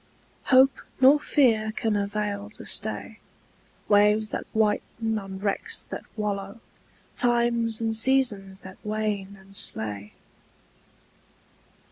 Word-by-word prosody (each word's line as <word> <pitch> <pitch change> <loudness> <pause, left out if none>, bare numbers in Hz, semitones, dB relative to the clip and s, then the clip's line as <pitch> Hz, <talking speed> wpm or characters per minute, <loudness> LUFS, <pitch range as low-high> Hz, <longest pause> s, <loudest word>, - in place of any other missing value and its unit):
Hope 265 0 +5 0.2
nor 270 +3 +7
fear 225 -7 +2
can 220 -1 -1
avail 205 0 -2
to - - -6
stay - - -1 0.7
Waves 210 +1 +4
that - - -4
whiten 220 +1 0
on 195 -1 -8
wrecks 210 - -2
that - - -7
wallow, 200 0 -3 0.6
Times 235 -2 +1
and 225 -1 -1
seasons 220 -6 +2
that 190 0 -11
wane 210 -2 -3
and 195 +1 -18
slay. 105 - -3
215 Hz, 105 wpm, -26 LUFS, 200-230 Hz, 0.7 s, nor